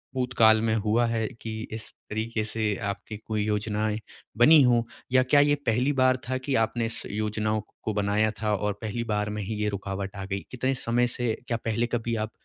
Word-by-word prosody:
भूतकाल 115 Hz, -4 st, +4 dB
में 110 Hz, -1 st, +1 dB
हुआ 110 Hz, +2 st, +2 dB
है 115 Hz, -1 st, 0 dB
कि 115 Hz, -, -5 dB, 0.2 s
इस 110 Hz, 0 st, -5 dB, 0.2 s
तरीके 110 Hz, 0 st, -2 dB
से 110 Hz, -1 st, -1 dB
आपकी 105 Hz, +2 st, -6 dB
कोई 110 Hz, 0 st, -3 dB
योजनाएँ 105 Hz, 0 st, -1 dB, 0.4 s
बनी 150 Hz, +6 st, +8 dB
हों 120 Hz, -2 st, +4 dB, 0.3 s
या 130 Hz, 0 st, +5 dB
क्या 135 Hz, +3 st, +4 dB
ये 145 Hz, 0 st, +4 dB
पहली 125 Hz, +5 st, +2 dB
बार 130 Hz, -1 st, +3 dB
था 130 Hz, -, 0 dB
कि 140 Hz, -, 0 dB
आपने 115 Hz, +1 st, -1 dB
इस 115 Hz, +1 st, -2 dB
योजनाओं 110 Hz, +1 st, -1 dB
को 105 Hz, -, -28 dB
को 110 Hz, -, -1 dB
बनाया 105 Hz, +1 st, +1 dB
था 105 Hz, -1 st, +1 dB
और 105 Hz, +1 st, -1 dB
पहली 115 Hz, +2 st, -3 dB
बार 105 Hz, 0 st, 0 dB
में 105 Hz, 0 st, -3 dB
ही 110 Hz, +3 st, -4 dB
ये 105 Hz, 0 st, 0 dB
रुकावट 100 Hz, 0 st, -4 dB
आ 100 Hz, -, -5 dB
गई? 100 Hz, 0 st, -3 dB
कितने 130 Hz, +1 st, 0 dB
समय 120 Hz, 0 st, +1 dB
से 120 Hz, -1 st, -1 dB
क्या 115 Hz, -, 0 dB
पहले 115 Hz, +1 st, 0 dB
कभी 115 Hz, -1 st, -2 dB
आप 110 Hz, 0 st, -3 dB
110 Hz, 205 wpm, -26 LUFS, 105-120 Hz, 0.4 s, बनी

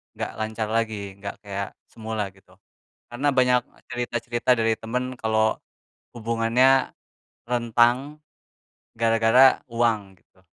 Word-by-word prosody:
enggak -, -, -4 dB
lancar 110 Hz, 0 st, -3 dB
lagi, 105 Hz, -4 st, -2 dB
enggak 100 Hz, 0 st, -6 dB
kayak 100 Hz, 0 st, -4 dB, 0.2 s
semula 110 Hz, -3 st, -4 dB
gitu. 95 Hz, -1 st, -23 dB, 0.5 s
Karena 130 Hz, +5 st, -1 dB
banyak 125 Hz, -2 st, +3 dB, 0.3 s
cerita-cerita 120 Hz, 0 st, -2 dB
dari 115 Hz, 0 st, +2 dB
temen 125 Hz, +3 st, -4 dB
kalau 110 Hz, -1 st, +1 dB, 0.6 s
hubungannya 115 Hz, +3 st, +2 dB, 0.6 s
rentang 120 Hz, +5 st, +1 dB, 0.8 s
gara-gara 115 Hz, +3 st, +5 dB
uang, 110 Hz, -5 st, 0 dB
gitu. 95 Hz, -, -31 dB
115 Hz, 100 wpm, -24 LUFS, 110-125 Hz, 0.8 s, gara-gara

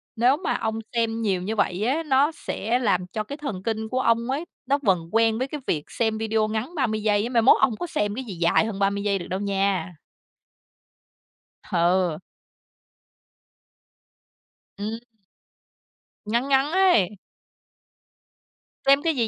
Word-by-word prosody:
nếu 245 Hz, +4 st, +3 dB
mà 365 Hz, -, -1 dB
ông 220 Hz, 0 st, -2 dB, 0.2 s
xem 230 Hz, -1 st, 0 dB
nhiều 195 Hz, -4 st, 0 dB
như 210 Hz, +5 st, -3 dB
vậy 200 Hz, -2 st, 0 dB
á, 300 Hz, +6 st, 0 dB
nó 280 Hz, +1 st, +3 dB
sẽ 245 Hz, -6 st, -2 dB
làm 195 Hz, -7 st, +1 dB
cho 215 Hz, +4 st, -4 dB
cái 280 Hz, +7 st, -7 dB
thần 245 Hz, -11 st, -5 dB
kinh 220 Hz, 0 st, -2 dB
của 255 Hz, -, -1 dB
ông 230 Hz, -1 st, +2 dB
ấy, 285 Hz, +6 st, -2 dB, 0.2 s
nó 275 Hz, +2 st, +2 dB
vần 180 Hz, -6 st, +1 dB
quen 225 Hz, 0 st, +3 dB
với 260 Hz, +3 st, -1 dB
cái 295 Hz, +1 st, -6 dB
việc 150 Hz, -3 st, 0 dB
xem 220 Hz, -2 st, 0 dB
video 220 Hz, 0 st, 0 dB
ngắn 220 Hz, +10 st, -4 dB
30 225 Hz, -7 st, 0 dB
giây 205 Hz, -1 st, +2 dB
á. 235 Hz, -, -3 dB
Mai 235 Hz, -2 st, +3 dB
mốt 250 Hz, -, +6 dB
ông -, -, +4 dB
không 215 Hz, -, -6 dB
có 350 Hz, -, -4 dB
xem 205 Hz, -9 st, -1 dB
cái 265 Hz, -, -4 dB
gì 220 Hz, -6 st, -7 dB
dài 170 Hz, +5 st, +3 dB
hơn 215 Hz, -3 st, -4 dB
30 200 Hz, 0 st, +1 dB
giây 200 Hz, -2 st, +1 dB
được 175 Hz, -, -7 dB
đâu 185 Hz, -, -3 dB
nha. 195 Hz, -4 st, -1 dB, 1.7 s
Ừ. 175 Hz, -2 st, +2 dB, 2.6 s
Ừm. 215 Hz, +3 st, -4 dB, 1.3 s
Ngắn 235 Hz, +5 st, 0 dB
ngắn 275 Hz, +2 st, +3 dB
ấy. 355 Hz, -, +3 dB, 1.7 s
Xem 275 Hz, +1 st, +5 dB
cái 325 Hz, -2 st, +1 dB
gì 235 Hz, -4 st, +1 dB
220 Hz, 165 wpm, -24 LUFS, 200-255 Hz, 2.6 s, mốt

